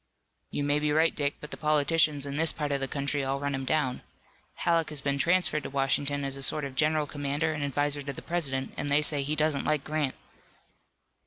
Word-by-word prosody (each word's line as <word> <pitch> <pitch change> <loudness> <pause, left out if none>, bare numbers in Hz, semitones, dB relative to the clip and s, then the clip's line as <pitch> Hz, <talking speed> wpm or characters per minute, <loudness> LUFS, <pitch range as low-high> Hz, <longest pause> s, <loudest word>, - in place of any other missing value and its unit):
"You 145 - -2
may 145 +1 +2
be 150 0 0
right, 160 +2 +3
Dick, 145 -1 0
but 150 - -9
the - - -6
politicians 150 -1 +2
in 140 0 -4
this 165 +2 +4
part 150 -2 -3
of 140 - +1
the 135 - -1
country 140 +1 -2
all 135 +1 -1
run 140 0 -2
him 135 -1 -3
down. 130 -2 0 0.5
Halleck 165 -2 +1
has 150 -1 -6
been 140 0 -1
transferred 175 -2 +2
to - - -6
Washington 140 +1 0
as 135 0 -3
a 135 - -7
sort 150 +2 +2
of 135 - -6
general 155 +2 +2
commander 145 +2 -1
and 150 -1 -3
adviser 145 +1 +1
to 140 0 -5
the - - -9
President, 135 -6 -2
and 145 - -2
they 145 +2 +4
say 145 -1 +2
he 145 +3 0
doesn't 155 -2 +1
like 150 -2 0
Grant." 150 -3 -1
145 Hz, 225 wpm, -28 LUFS, 140-155 Hz, 0.5 s, this